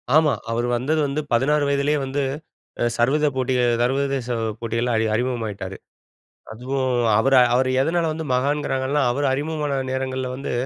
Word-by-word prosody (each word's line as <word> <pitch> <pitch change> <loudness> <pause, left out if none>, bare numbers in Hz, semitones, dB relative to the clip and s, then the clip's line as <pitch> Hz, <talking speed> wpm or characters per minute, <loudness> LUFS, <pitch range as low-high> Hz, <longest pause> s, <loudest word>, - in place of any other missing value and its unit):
ஆமா. 155 -2 +5 0.2
அவரு 120 +1 0
வந்தது 155 +6 0
வந்து, 145 +3 -2
16 145 +5 +2
வயதிலேயே 140 +1 +1
வந்து 140 +2 -2 0.8
சர்வத 145 +6 +2
போட்டிகள் 125 -2 +1
சர்வதேச 135 0 0 0.3
போட்டிகள்ல 115 +1 -1
அறி 110 - +1
அறிமுகமாகிட்டாரு. 110 -6 -3 0.8
அதுவும் 130 +3 -2 0.3
அவர 135 +4 +3 0.2
அவர 130 +1 +2
எதனால 165 +2 +1
வந்து 160 0 -5
மகான்கிறாங்கன்னா, 140 +1 0
அவரு 140 +3 0
அறிமுகமான 145 -1 -2
நேரங்கள்ல 130 -1 -2
வந்து, 135 0 -5
135 Hz, 130 wpm, -22 LUFS, 125-145 Hz, 0.8 s, ஆமா